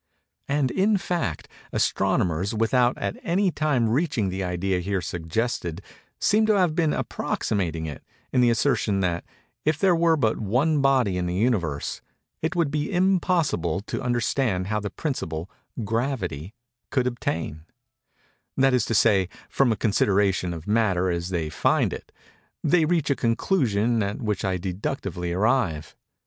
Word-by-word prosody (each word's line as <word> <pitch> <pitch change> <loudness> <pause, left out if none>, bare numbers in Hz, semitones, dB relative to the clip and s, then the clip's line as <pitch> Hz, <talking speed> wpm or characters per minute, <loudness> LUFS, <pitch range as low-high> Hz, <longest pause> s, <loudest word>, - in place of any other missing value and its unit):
And, 140 -2 +1
in 205 +2 +2
fact, 170 - -2 0.2
astronomers, 90 +6 +1
without 120 +3 +2
at 100 0 -3
any 185 +2 +1
time 145 -7 +1
reaching 120 - 0
the 95 +1 -3
idea 90 +1 -1
here 95 +2 -1
suggested, 85 +1 -3 0.4
seem 215 +1 +3
to 215 -2 +4
have 180 -4 +3
been 160 -2 +2
approximating 85 - -2
it, 75 -3 -7 0.3
in 125 - +4
the 120 - +5
assertion 105 -3 +1
that 85 -2 0 0.4
"if 155 0 +1
there 180 +2 +3
were 165 -1 +3
but 115 -6 +1
one 135 +9 +1
body 130 -9 +3
in 90 -1 -1
the 90 - -2
Universe, 90 - -1 0.4
it 160 +4 -1
would 165 -5 +1
be 150 0 -1
impossible 175 - +1
to - - -5
understand 120 -5 0
how 105 +2 -1
the 105 0 -4
principle, 90 - -4 0.3
Gravity, 110 - -2 0.3
could 130 -2 +1
obtain:"—that 125 - -4
is 125 -3 +2
to 115 - -1
say, 95 -1 +4 0.2
from 135 -4 +2
a - - +2
consideration 100 -3 +2
of 80 -1 -7
Matter 100 -4 +2
as 85 +1 -2
they 85 -4 -1
find - - +1
it, - - -9 0.5
they 170 -3 +4
reach 160 -3 +1
a - - +3
conclusion 115 - +1
at 100 0 -2
which 105 -4 -2
I 95 -2 0
deductively 90 - -3
arrive. 95 - 0
110 Hz, 150 wpm, -25 LUFS, 90-140 Hz, 0.5 s, the